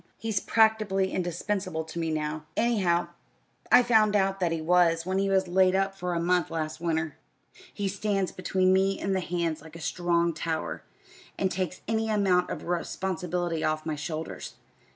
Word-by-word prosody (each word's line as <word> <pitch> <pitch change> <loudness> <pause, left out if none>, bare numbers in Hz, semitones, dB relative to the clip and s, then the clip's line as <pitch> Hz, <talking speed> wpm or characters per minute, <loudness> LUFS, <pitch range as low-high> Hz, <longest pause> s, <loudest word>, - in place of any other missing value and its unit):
"He's 220 -3 -1
practically 215 -4 +2
indispensable 180 -1 -2
to 160 +2 -7
me 165 -1 -1
now 155 0 -3
anyhow, 195 -7 +2 0.6
I 250 - +8
found 220 -3 +4
out 195 -1 +2
that 175 -3 +1
he 165 - -1
was 165 0 +3
when 190 +1 0
he 195 0 +1
was 190 -1 +2
laid 185 +1 +3
up 195 0 +1
for 180 -2 -3
a - - 0
month 175 0 +1
last 155 -1 -4
winter. 160 -3 -1 0.5
He 200 - -3
stands 195 -1 -1
between 185 0 +1
me 195 +1 +2
and 195 0 -1
the - - +1
hands 170 -3 -2
like 160 +1 -13
a - - -8
strong 170 0 0
tower, 160 0 -3 0.6
and 190 -1 0
takes 180 -1 -3
any 220 0 0
amount 195 -4 +2
of - - -5
responsibility 175 -1 -2
off 155 0 -1
my 155 -1 -2
shoulders. 155 +2 -5
180 Hz, 170 wpm, -27 LUFS, 165-195 Hz, 0.6 s, I